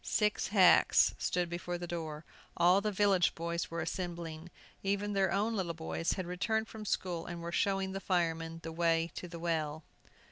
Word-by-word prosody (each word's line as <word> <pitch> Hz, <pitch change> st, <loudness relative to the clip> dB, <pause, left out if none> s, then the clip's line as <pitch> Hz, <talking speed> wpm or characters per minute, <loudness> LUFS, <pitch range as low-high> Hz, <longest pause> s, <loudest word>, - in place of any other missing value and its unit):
Six 210 Hz, -1 st, +1 dB
hacks 195 Hz, -3 st, +5 dB
stood 180 Hz, -1 st, 0 dB
before 175 Hz, +1 st, -4 dB
the 175 Hz, -, -5 dB
door. 160 Hz, -2 st, -5 dB, 0.3 s
All 180 Hz, +3 st, +5 dB
the 210 Hz, +1 st, -1 dB
village 195 Hz, -3 st, +3 dB
boys 170 Hz, +1 st, -3 dB
were 170 Hz, -, -3 dB
assembling. 170 Hz, -2 st, -5 dB, 0.3 s
Even 200 Hz, +1 st, -1 dB
their 195 Hz, -2 st, +2 dB
own 210 Hz, +4 st, +1 dB
little 175 Hz, -5 st, -2 dB
boys 165 Hz, +1 st, -2 dB
had 185 Hz, -, -4 dB
returned 220 Hz, +5 st, -1 dB
from 220 Hz, -1 st, -9 dB
school, 180 Hz, -4 st, -2 dB
and 175 Hz, -1 st, -5 dB
were 170 Hz, 0 st, -5 dB
showing 195 Hz, +1 st, +1 dB
the 195 Hz, -, -3 dB
firemen 165 Hz, -3 st, -1 dB
the 165 Hz, -, -5 dB
way 165 Hz, 0 st, +1 dB
to 180 Hz, -, -6 dB
the 170 Hz, -1 st, -8 dB
well. 160 Hz, -2 st, -2 dB
175 Hz, 180 wpm, -32 LUFS, 165-195 Hz, 0.3 s, hacks